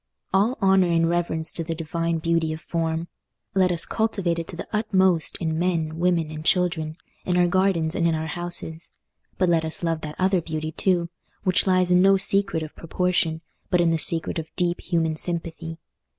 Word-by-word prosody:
All 210 +7 +2
honour 190 -1 +5
and 165 -1 +3
reverence 165 -2 -1
to 165 - -3
the 165 0 -4
divine 165 +1 -2
beauty 165 0 0
of 155 - -8
form! 165 0 -2 0.5
Let 185 -2 +3
us 170 -1 +2
cultivate 195 -6 -1
it 165 - -5
to 185 - -7
the - - -7
utmost 190 -6 +2
in 160 -2 -2
men, 165 -3 -1
women, 170 -3 +1
and 155 0 -7
children—in 175 0 -1
our 180 - +5
gardens 175 -3 +1
and 170 - +1
in 165 - +1
our 160 0 -3
houses. 170 0 -3 0.5
But 185 - +2
let 165 -2 +3
us 160 +2 -1
love 165 -2 -1
that 150 -1 -6
other 185 -1 +2
beauty 155 -1 -4
too, 175 0 0 0.3
which 185 +1 +2
lies 185 -1 +3
in 180 0 +5
no 195 +1 +5
secret 195 -3 +2
of 155 - -9
proportion, 165 -1 -1 0.3
but 180 - +2
in 170 -1 +3
the 165 - +1
secret 165 +1 +2
of 160 - -6
deep 175 -1 0
human 165 -3 0
sympathy. 165 -1 -3
170 Hz, 190 wpm, -24 LUFS, 160-180 Hz, 0.5 s, honour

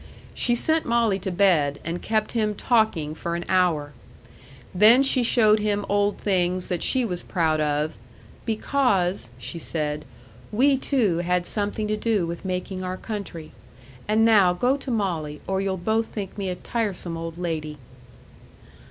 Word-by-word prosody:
She 240 - +2
sent 315 +6 +2
Molly 230 -4 +2
to 190 - -4
bed, 175 -7 +2
and 170 +2 -3
kept 215 -1 -1
him 215 -3 0
talking 205 -11 +1
for 170 +2 -4
an 175 - -4
hour. 165 -6 +1 0.8
Then 220 +8 +6
she 265 -1 +3
showed 220 -3 +4
him 205 -1 -1
old 205 0 +1
things 185 -2 0
that 175 -2 -2
she 260 -2 +1
was 180 -5 -3
proud 160 -4 0
of, 150 +1 -1 0.4
"because," 210 - 0
she 125 +7 -6
said, 150 -2 -3 0.5
"we, 270 +6 +4
too, 240 - +1
had 180 0 0
something 210 +1 -2
to 215 0 -1
do 210 -4 0
with 170 0 -6
making 185 0 -3
our 185 0 -4
country. 190 -8 -6 0.6
And 215 +1 +3
now 200 -5 +5
go 245 +9 +1
to 275 -1 -7
Molly, 170 -10 -2
or 190 0 -1
you'll 195 -1 -1
both 220 +5 0
think 200 -3 -6
me 195 -2 -3
a 180 - -2
tiresome 195 -6 -3
old 165 0 -6
lady." 155 -4 -4
190 Hz, 160 wpm, -24 LUFS, 170-220 Hz, 0.8 s, Then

